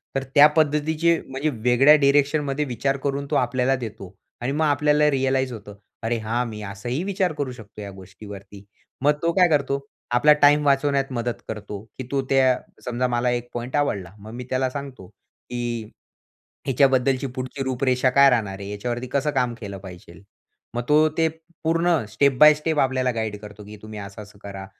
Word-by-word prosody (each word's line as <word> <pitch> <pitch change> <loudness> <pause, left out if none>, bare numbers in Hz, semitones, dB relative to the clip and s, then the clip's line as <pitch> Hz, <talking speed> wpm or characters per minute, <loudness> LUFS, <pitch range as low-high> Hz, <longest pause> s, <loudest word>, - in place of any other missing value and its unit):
तर 135 - 0
त्या 145 +1 +9
पद्धतीचे 155 +2 +2
म्हणजे 135 +3 -2
वेगळ्या 130 +5 +6
डायरेक्शनमध्ये 145 0 +2
विचार 135 +2 -1
करून 140 0 -1
तो - - +1
आपल्याला 130 +1 +1
देतो 105 -6 -8 0.3
आणि 125 +3 -1
मग 155 +3 +1
आपल्याला 150 0 +3
रियलाईज 130 -1 0
होतं. 105 -2 -10 0.3
अरे 115 +1 0
हा, 115 +3 -1
मी 105 -2 -7
असाही 115 - -4
विचार 190 -3 -1
करू 145 -3 -3
शकतो 110 -3 -11
या 100 - -7
गोष्टीवरती. 100 +1 -12 0.4
मग 145 +2 +4
तो 170 0 +1
काय 180 -2 +5
करतो? 140 -2 +1 0.3
आपला 150 +5 +6
टाईम 145 +1 +5
वाचवण्यात 140 -1 +2
मदत 120 -3 -3
करतो, 105 -2 -6 0.2
की 130 - -5
तो 135 -1 +1
त्या 130 -2 +4 0.3
समजा 125 +1 -1
मला 120 0 0
एक 120 0 -2
पॉइंटआवडला. 120 -7 -2
मग 110 +2 -11
मी 125 +1 -6
त्याला 130 0 0
सांगतो 135 -8 -8
की 120 +3 -7 0.8
हिच्याबद्दलची 135 0 +2
पुढची 130 +2 -4
रूपरेषा 130 0 +1
काय 140 +1 +6
राहणार 105 -6 -1
आहे? 100 0 -7
याच्यावरती 120 +4 -4
कसं 140 +2 +1
काम 125 -3 0
केलं 100 -3 -7
पाहिजे? 90 -2 -12 0.6
मग 120 - 0
तो 155 +1 +5
ते 165 0 +3 0.4
पूर्ण 165 -2 +2
स्टेप 130 +5 +2
बाय 150 0 +9
स्टेप 155 0 -1
आपल्याला 130 -1 +1
गाईड 110 -2 -3
करतो, 105 0 -11
की 105 +1 -11
तुम्ही 110 -1 -8
असं-असं 100 +1 -10
करा. 100 -1 -7
130 Hz, 170 wpm, -23 LUFS, 110-140 Hz, 0.8 s, त्या